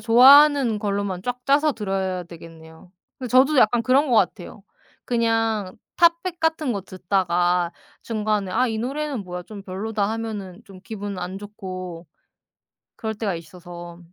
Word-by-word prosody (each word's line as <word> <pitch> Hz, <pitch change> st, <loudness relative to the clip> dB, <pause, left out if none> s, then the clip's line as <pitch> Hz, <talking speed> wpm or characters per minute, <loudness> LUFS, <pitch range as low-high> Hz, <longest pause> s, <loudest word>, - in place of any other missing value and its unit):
좋아하는 265 Hz, 0 st, +6 dB
걸로만 200 Hz, -3 st, -2 dB
쫙 245 Hz, +2 st, -3 dB
짜서 290 Hz, +2 st, +3 dB
들어야 190 Hz, -4 st, -2 dB
되겠네요. 165 Hz, 0 st, -14 dB, 0.3 s
그 255 Hz, -, -5 dB
저도 265 Hz, +4 st, +4 dB
약간 230 Hz, +1 st, +4 dB
그런 265 Hz, +4 st, +3 dB
것 240 Hz, -, +3 dB
같아요. 195 Hz, 0 st, -1 dB, 0.4 s
그냥 225 Hz, -4 st, 0 dB, 0.2 s
탑 340 Hz, -1 st, +4 dB
100 360 Hz, -2 st, -5 dB
같은 320 Hz, -5 st, 0 dB
거 200 Hz, -3 st, -4 dB
듣다가 180 Hz, -2 st, 0 dB, 0.3 s
중간에 210 Hz, -3 st, -1 dB
'아, 250 Hz, +3 st, +2 dB
이 225 Hz, -2 st, -2 dB
노래는 275 Hz, +1 st, -3 dB
뭐야. 180 Hz, 0 st, -6 dB
좀 205 Hz, -1 st, -10 dB
별로다.' 200 Hz, +2 st, -2 dB
하면은 215 Hz, -4 st, -5 dB
좀 195 Hz, -3 st, -14 dB
기분 205 Hz, -3 st, -6 dB
안 180 Hz, +2 st, -5 dB
좋고 185 Hz, -4 st, -8 dB, 0.9 s
그럴 220 Hz, -1 st, -4 dB
때가 205 Hz, -4 st, -2 dB
있어서. 175 Hz, +1 st, -10 dB
210 Hz, 285 characters per minute, -23 LUFS, 185-245 Hz, 0.9 s, 좋아하는